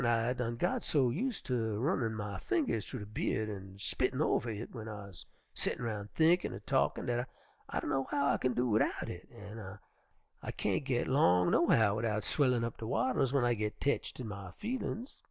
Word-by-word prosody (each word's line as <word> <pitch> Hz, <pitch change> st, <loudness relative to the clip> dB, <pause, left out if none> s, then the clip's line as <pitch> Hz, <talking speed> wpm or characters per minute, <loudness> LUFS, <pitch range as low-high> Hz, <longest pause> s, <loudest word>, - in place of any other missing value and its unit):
I 120 Hz, +1 st, +2 dB
done 120 Hz, -2 st, -2 dB
got 115 Hz, -, 0 dB
so 130 Hz, -5 st, +3 dB
use 230 Hz, -, -1 dB
ter 115 Hz, -5 st, -1 dB
runnin' 115 Hz, -3 st, +1 dB
my 105 Hz, -3 st, -4 dB
fingers 260 Hz, -, 0 dB
thu 130 Hz, -, -5 dB
de 105 Hz, -, -6 dB
by'ud 110 Hz, +1 st, -1 dB
an' 95 Hz, 0 st, -10 dB
spittin' 130 Hz, +6 st, 0 dB
over 135 Hz, -5 st, +2 dB
hit 110 Hz, +1 st, -4 dB
w'en 110 Hz, -3 st, -7 dB
I'se 100 Hz, -4 st, -8 dB, 0.3 s
settin' 120 Hz, -, -2 dB
roun' 105 Hz, -3 st, -3 dB
thinkin' 165 Hz, +8 st, +3 dB
er -, -, -6 dB
talkin' -, -, +1 dB
dat 120 Hz, +1 st, -1 dB, 0.4 s
I -, -, -1 dB
dunno 135 Hz, 0 st, 0 dB
how 140 Hz, 0 st, +2 dB
I -, -, 0 dB
kin 130 Hz, -1 st, +1 dB
do 125 Hz, +1 st, +2 dB
widout 110 Hz, -1 st, +1 dB
hit, 90 Hz, -, -8 dB
an' 105 Hz, -3 st, -8 dB, 0.6 s
I -, -, -4 dB
kain't -, -, 0 dB
git -, -, +1 dB
long, 90 Hz, 0 st, +4 dB
no 170 Hz, -, +4 dB
how, 105 Hz, -2 st, +4 dB
widout 110 Hz, -1 st, 0 dB
swellin' 125 Hz, -1 st, +2 dB
up 115 Hz, -, -3 dB
de 110 Hz, -, -5 dB
wattles 140 Hz, -, +2 dB
w'en 135 Hz, -2 st, +2 dB
I 120 Hz, -, +3 dB
git 105 Hz, -1 st, -3 dB
tetched 140 Hz, -1 st, -1 dB
in 125 Hz, -, -4 dB
my 100 Hz, -2 st, -6 dB
feelin's. 245 Hz, +2 st, -4 dB
115 Hz, 200 wpm, -33 LUFS, 105-130 Hz, 0.6 s, long